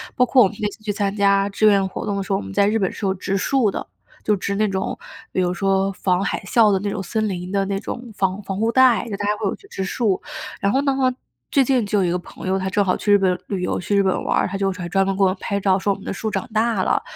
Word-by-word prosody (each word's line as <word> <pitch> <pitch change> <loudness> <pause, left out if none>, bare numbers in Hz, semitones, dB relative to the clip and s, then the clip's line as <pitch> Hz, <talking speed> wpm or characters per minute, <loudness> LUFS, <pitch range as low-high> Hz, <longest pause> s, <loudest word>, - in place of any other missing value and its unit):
包 250 - +4
括 250 0 +5
我 195 - +4
们 205 - -9
那 210 - +1
次 215 - -15
去 215 - -1
参 200 -1 -1
加 200 -1 +3
志 200 +2 0
愿 200 -2 +5
活 - - -6
动 205 - -1
的 - - -1
时 - - -7
候， 195 - +3
我 - - -4
们 95 0 -8
在 200 - +3
日 215 +2 +2
本 195 -4 0
是 210 - -5
有 190 - +2
植 195 +1 -3
树 225 +2 +2
的， - - -5 0.4
就 210 - +2
植 200 +1 -3
那 215 +1 +2
种 190 -1 -2 0.3
比 185 - 0
如 180 0 +1
说 195 +1 +1
防 185 0 0
海 - - -1
啸 215 +2 +4
的 195 - +2
那 200 +1 -2
种 200 - -3
森 215 +3 -1
林 180 -2 -4
的 195 0 +1
那 195 0 -2
种 240 +2 -7
防 190 0 0
防 195 -1 -4
护 225 +1 +1
带， 260 -2 +5
就 200 - -4
大 205 - -3
家 210 +1 +1
会 210 - -2
有 - - -1
去 400 - -19
植 190 - -4
树。 200 0 0 0.4
然 200 - +1
后 270 - +2
呢， 280 -1 +1 0.6
最 275 - +4
近 255 -2 +2
就 205 0 +1
有 185 - +2
一 170 - 0
个 180 - 0
朋 180 - -10
友， 190 +1 +1
他 190 - -2
正 200 +1 +1
好 185 - +2
去 205 - -1
日 - - +8
本 185 -2 +2
旅 195 -3 -3
游， - - -1
去 200 +3 -1
日 200 - +4
本 190 -1 0
玩 - - +1
儿， - - +2
他 190 - -5
就 195 0 0
专 180 +1 0
门 195 -1 -1
给 195 - +3
我 - - +6
们 185 - -2
拍 200 0 -1
照 190 -1 +2
说 200 - +1
我 195 - -2
们 195 - -13
的 - - -3
树 220 +2 -3
长 - - -3
大 220 -3 +1
了， - - +1
200 Hz, 340 characters per minute, -21 LUFS, 190-210 Hz, 0.6 s, 日